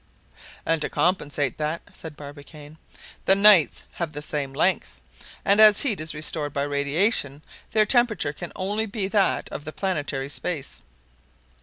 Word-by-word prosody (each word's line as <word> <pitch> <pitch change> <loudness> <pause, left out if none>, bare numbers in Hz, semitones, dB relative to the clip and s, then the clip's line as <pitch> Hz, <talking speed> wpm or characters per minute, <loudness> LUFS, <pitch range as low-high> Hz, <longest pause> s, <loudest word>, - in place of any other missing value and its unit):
"And 165 -1 +1
to - - -1
compensate 145 -7 -1
that," 155 +2 -3
said 155 -2 -9
Barbicane, 145 +1 -12 0.5
"the 195 - +5
nights 200 - +6
have 170 -3 -5
the 145 0 -6
same 145 -3 -3
length; 165 +6 -1 0.5
and 200 +2 +5
as 210 -1 +7
heat 235 -8 0
is 155 0 -2
restored 150 -1 -1
by 140 - -1
radiation, 145 - 0 0.3
their 215 -1 +3
temperature 215 - +1
can 175 +3 -8
only 205 +4 -2
be 200 -2 -3
that 200 -2 +1
of - - -7
the 155 - -7
planetary 145 -5 -3
space." 150 -1 -5
155 Hz, 150 wpm, -24 LUFS, 145-195 Hz, 0.5 s, as